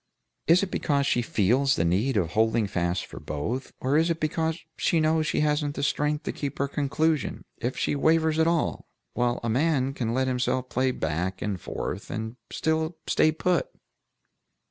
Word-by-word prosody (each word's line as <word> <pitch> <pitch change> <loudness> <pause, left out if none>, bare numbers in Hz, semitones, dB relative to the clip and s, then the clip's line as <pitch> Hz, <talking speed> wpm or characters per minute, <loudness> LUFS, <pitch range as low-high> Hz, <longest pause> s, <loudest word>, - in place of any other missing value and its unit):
Is 170 +4 +5
it 195 - -3
because 140 -2 +1
she 120 - +2
feels 120 +5 +2
the 85 - +1
need 105 +9 +1
of 85 -4 0
holding 110 +1 +2
fast 85 -2 -1
for - - -10
both, 110 - -4
or 135 +3 +1
is 165 +2 +3
it 165 -1 0
because 160 +1 -1 0.2
she 165 - +1
knows 155 0 +2
she - - +1
hasn't 150 -1 +1
the - - -3
strength 150 +1 0
to - - -2
keep 140 -2 -4
to - - -1
her - - 0
conclusion, 150 +2 0
if 120 +2 -3
she - - 0
wavers 160 +2 +3
at 160 - +4
all, 165 -2 0 0.3
while 120 0 0
a - - -1
man 135 +1 +1
can 115 -4 -2
let 130 +2 +1
himself 125 0 0
play 130 +1 +1
back 90 -2 -2
and 100 -5 -3
forth, 100 +6 -5
and 110 +1 -4
still 160 +1 -1
stay 155 - +3
put." 180 - 0
135 Hz, 190 wpm, -26 LUFS, 115-155 Hz, 0.3 s, Is